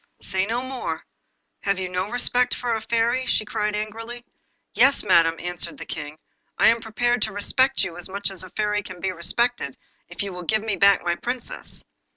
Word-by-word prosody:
'Say 190 0 -1
no 235 +3 -1
more. 260 -1 -4 0.6
Have 200 -1 +1
you 190 -1 -2
no 180 +2 -2
respect 245 +1 +2
for 240 -1 -1
a 220 - -1
Fairy?' 235 +3 +1 0.2
cried 210 0 -1
she 210 - +1
angrily. 230 +3 -8 0.5
'Yes, 280 - +5
madam,' 165 -4 +5
answered 175 0 -5
the - - -7
King, 150 0 -6 0.4
'I - - +6
am 230 0 +2
prepared 240 +1 0
to - - +1
respect 260 +7 +3
you 170 - -4
as 175 - -3
much 200 +1 0
as 185 -1 -4
a 185 - -9
Fairy 210 0 0
can 185 -3 -10
be 190 +1 -1
respected, 235 +8 0 0.3
if - - -4
you 200 -2 -4
will 180 - -5
give 215 +5 0
me 215 -3 0
back 200 0 +5
my 175 0 +1
Princess. 245 +5 -4
210 Hz, 195 wpm, -24 LUFS, 185-240 Hz, 0.6 s, I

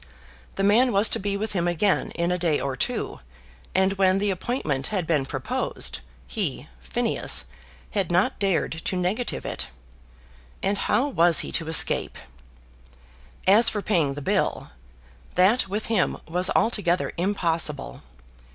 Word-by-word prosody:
The 195 - -1
man 230 +6 +4
was 200 +1 +4
to - - +2
be 200 0 -1
with 215 +1 -3
him 175 -3 0
again 175 +3 +1
in 170 +1 0
a 180 - -1
day 165 -4 +1
or 135 -1 -3
two, - - -3 0.6
and 190 +1 +3
when 190 0 +4
the 200 0 +1
appointment 175 - -2
had 190 -5 -2
been 150 -5 0
proposed, - - -3 0.3
he, - - -3
Phineas, - - -1 0.5
had 190 -4 -1
not 180 +3 +1
dared 195 -4 +1
to - - -1
negative 185 +7 -2
it. - - -3 1.0
And 195 +1 0
how 270 - +1
was 170 - +4
he - - -5
to 165 - -1
escape? 160 - +3 1.3
As 220 +5 +6
for 210 -2 -3
paying 155 -9 +1
the 145 - -6
bill, - - -1 0.6
that 190 +7 +3
with 205 +3 -3
him 220 -5 +1
was 180 +3 +2
altogether 200 -6 +1
impossible. 165 - -2
185 Hz, 145 wpm, -24 LUFS, 165-205 Hz, 1.3 s, As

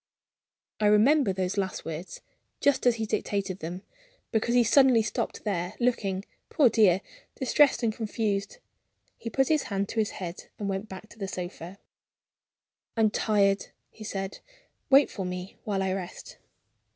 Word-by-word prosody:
I 210 - +3
remember 220 +4 +5
those 185 +1 -1
last 190 -1 -3
words, 165 +3 -6 0.4
just 280 -3 +2
as 240 - +5
he 225 -1 -2
dictated 200 -3 -2
them, 175 +4 -6 0.5
because 235 +1 +1
he 245 - +6
suddenly 250 -1 +5
stopped 215 - -3
there; 180 -4 -2
looking, 205 -6 0 0.2
poor 285 -7 +4
dear, 195 -5 +4 0.4
distressed 265 0 +3
and 225 -2 +1
confused. 215 - -2 0.6
He 230 - -6
put 270 +3 +2
his 310 -2 +3
hand 200 -1 -1
to 225 - -2
his 215 - +1
head, 175 -2 -6
and 205 - -4
went 195 +2 -3
back 190 +3 -9
to 225 - -16
the 195 - -3
sofa. 180 0 -6 1.2
"I'm 220 -2 +4
tired," 200 -2 +2 0.2
he 220 - -12
said. 195 -2 -4 0.5
"Wait 275 +1 +6
for 195 - -4
me 180 +1 -6
while 195 -2 0
I 190 - 0
rest." 185 -2 -7
205 Hz, 155 wpm, -27 LUFS, 190-230 Hz, 1.2 s, he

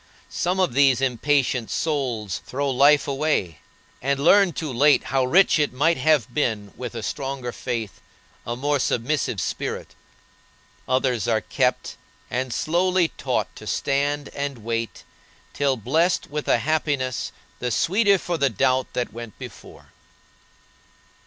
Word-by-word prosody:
Some 180 +2 -1
of 180 -10 +2
these 135 -1 +4
impatient 130 -1 +1
souls 125 - -2
throw 140 +1 -1
life 140 +2 +4
away, 140 - -1 0.4
and 140 +1 0
learn 190 +5 +5
too 155 -5 -4
late 145 +4 +4
how 135 -1 0
rich 175 +5 +4
it 150 - +1
might 165 +6 +2
have 145 -3 +2
been 110 -9 -1
with 125 -1 -6
a 115 - -5
stronger 135 -2 -4
faith, 115 -5 -5 0.4
a 120 - -4
more 145 +3 0
submissive 125 -3 0
spirit. - - -4 0.9
Others 130 -4 +1
are 110 -2 +2
kept, 90 - -1 0.3
and 130 0 -2
slowly 175 +5 +1
taught - - -3
to - - -11
stand 145 +1 -1
and 140 -5 -5
wait, 115 0 -3 0.5
till 140 -2 +1
blest 155 - +1
with 150 0 -4
a - - +4
happiness 140 -1 -1 0.3
the 125 - -2
sweeter 200 - +3
for 175 -2 -3
the 140 - +3
doubt 130 +3 0
that 125 - -2
went 115 -2 -9
before. - - -12
135 Hz, 140 wpm, -23 LUFS, 120-150 Hz, 0.9 s, learn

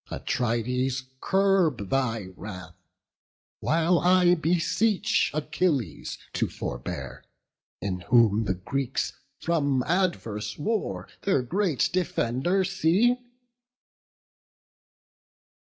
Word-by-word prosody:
Atrides, 125 +2 -1 0.2
curb 190 - +2
thy 115 -7 0
wrath! 95 -2 -8 0.8
while 165 +2 +2
I 180 +2 +5
beseech 180 +5 +1
Achilles 145 - -1 0.2
to - - 0
forbear; - - -6 0.6
in 95 -1 -2
whom 115 -3 +4
the 95 - 0
Greeks 135 +8 -2 0.2
From 145 -6 +1
adverse 125 - -1
war 220 +8 -2
their 165 -10 +1
great 175 +1 0
defender 175 +1 +1
see." 195 +6 +2
145 Hz, 80 wpm, -26 LUFS, 115-180 Hz, 0.8 s, I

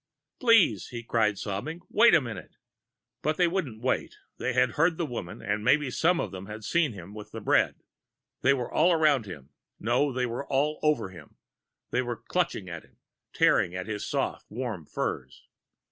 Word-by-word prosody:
"Please!" 225 - +4
he 120 -1 -7
cried, 110 -3 +1
sobbing. 110 - -4
"Wait 235 -1 +6
a 160 - +5
minute!" 110 -7 -8 0.7
But 155 +1 0
they 180 - +4
weren't 150 - -3
waiting. 130 - -1 0.2
They - - -1
had 125 -1 +3
heard 165 +6 +2
the 170 - -1
woman 120 - -6
and 105 +1 -1
maybe 140 +2 +3
some 170 +6 +2
of - - -2
them 95 0 -8
had 105 +1 -8
seen 155 +2 +1
him 95 0 -10
with 105 0 -9
the 110 - -6
bread. 105 - +2 0.7
They 140 +2 +4
were 125 -3 -4
all 170 +3 +4
around 150 -8 +3
him 75 -8 -10 0.3
no, 125 +6 +1
they 125 0 0
were 125 +3 -4
all 145 +3 +1
over 150 -10 +1
him; 85 -5 -14 0.5
they 125 - +2
were 120 -2 -3
clutching 170 - -2
at 85 -2 -7
him, - - -25 0.3
tearing 90 - +3
at 90 0 -4
his 105 -1 -4
soft, - - -2
warm 110 - -5
furs. - - -4
125 Hz, 185 wpm, -28 LUFS, 105-155 Hz, 0.7 s, Wait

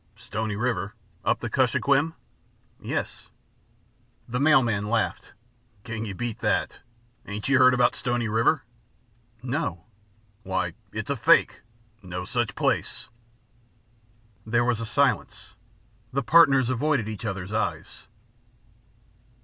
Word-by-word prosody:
"Stony 110 0 -4
River? 110 -2 -2 0.3
Up - - +1
the - - -3
Kuskokwim?" 145 +4 +2 0.6
"Yes!" - - -4 1.0
The 125 +1 -2
mail 145 -1 +5
man 105 -3 -1
laughed. 115 -1 -1 0.5
"Can 110 -1 -5
you 100 -3 -5
beat 120 +1 -4
that? - - 0 0.5
Ain't 105 +1 -4
you 135 -1 +4
heard 130 0 +6
about 125 0 +3
Stony 120 -2 -1
River?" 115 +8 +2 0.8
"No!" 125 - -3 0.6
"Why, 95 -3 -2 0.2
it's 110 +4 -4
a - - +1
fake 120 -2 +3 0.4
no 90 -1 -6
such 120 +2 -1
place." - - -1 1.3
There 120 +2 +1
was 120 -2 +1
a 115 - -4
silence; 110 -6 0 0.6
the 135 +1 -1
partners 135 -4 +5
avoided 130 -2 0
each 110 -1 -6
other's 100 -2 -4
eyes. 110 -2 -3
115 Hz, 115 wpm, -26 LUFS, 105-130 Hz, 1.3 s, heard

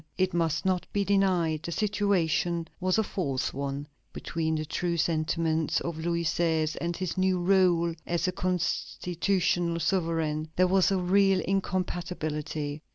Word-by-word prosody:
It 185 0 +1
must 165 +1 0
not 185 -1 0
be 205 - +1
denied, 185 -6 +2
the 170 - -5
situation 180 -5 0
was 185 +1 +1
a 220 - +3
false 145 -11 -2
one. 140 +1 -4 0.3
Between 160 -1 -2
the 155 0 -2
true 170 +3 -2
sentiments 160 0 +1
of 170 -2 -4
Louis 170 +1 -1
XVI. 160 -1 +1
and 170 0 -2
his 185 0 -3
new 185 0 +2
rôle 175 -2 +3
as 170 +1 0
a - - +1
constitutional 180 -1 0
sovereign, 160 -3 0
there 185 - +4
was 190 0 +3
a 195 - +1
real 190 +1 +3
incompatibility. 160 -6 -2
170 Hz, 145 wpm, -28 LUFS, 160-185 Hz, 0.3 s, there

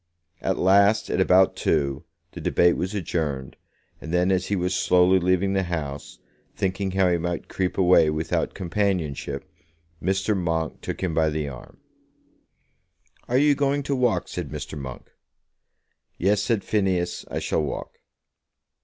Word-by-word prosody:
At - - 0
last, 100 +4 +4
at - - +1
about 95 0 +4
two, 70 -4 0 0.3
the - - -8
debate 85 0 +3
was 95 +3 -3
adjourned, 75 -8 -3 0.5
and 80 - -7
then 90 +2 +2
as 95 -1 0
he 100 - 0
was 90 0 -1
slowly 90 +1 +4
leaving 95 +2 +1
the 95 - +2
House, 75 -6 -5 0.4
thinking 95 +1 -1
how 95 -1 +3
he 85 -1 +2
might 85 +1 -3
creep 90 -1 -2
away 90 -4 +5
without 75 +1 -1
companionship, 90 -5 -2 0.6
Mr. 95 +3 0
Monk 80 -3 -2
took - - -5
him 90 -3 -1
by 80 0 +2
the 75 -1 -2
arm. 65 -3 -10 1.5
"Are 125 - +2
you 145 +1 +5
going 140 0 0
to 140 0 -1
walk?" 125 -3 +1
said 85 -5 -5
Mr. 75 0 -6
Monk. 65 -4 -8 1.1
"Yes", 100 +3 +2
said 110 -2 0
Phineas; 95 -4 0
"I - - -4
shall - - 0
walk." 75 - -5
90 Hz, 150 wpm, -24 LUFS, 80-100 Hz, 1.5 s, away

